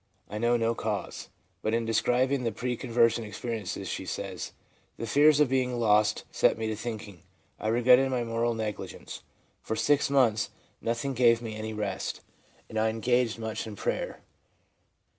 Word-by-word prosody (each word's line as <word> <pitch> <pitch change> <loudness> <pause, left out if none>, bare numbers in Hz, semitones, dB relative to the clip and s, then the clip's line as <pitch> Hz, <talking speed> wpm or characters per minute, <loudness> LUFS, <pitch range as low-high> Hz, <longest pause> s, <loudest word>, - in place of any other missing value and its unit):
I 105 - -5
know 120 +1 +3
no 115 0 +1
cause.' 110 -3 -4 0.3
But 110 +1 0
in 115 0 0
describing 125 +4 +2
the 115 - 0
pre 125 +3 -2
con 125 - -7
version 115 0 +3
experiences, 110 -1 -4
she - - -4
says, - - -4 0.2
' - - -38
The - - -4
fears 145 +6 +5
of 150 - +5
being 125 -1 0
lost 105 -1 +3
set - - +3
me 110 - -3
to 110 - -2
thinking; 105 -5 -6 0.4
I - - -3
regretted 125 +3 +5
my 125 -2 0
moral 115 0 0
negligence; 110 -2 -5 0.4
for 110 - -3
six 145 +4 +2
months 120 -5 +3 0.3
nothing 115 +4 -1
gave 120 -2 +5
me 115 -2 -6
any 110 0 -4
rest, 100 -3 -3 0.5
and 110 - -3
I 110 0 +3
engaged 115 +1 +1
much 110 0 -4
in 105 - -7
prayer.' - - -3
115 Hz, 170 wpm, -28 LUFS, 110-125 Hz, 0.5 s, fears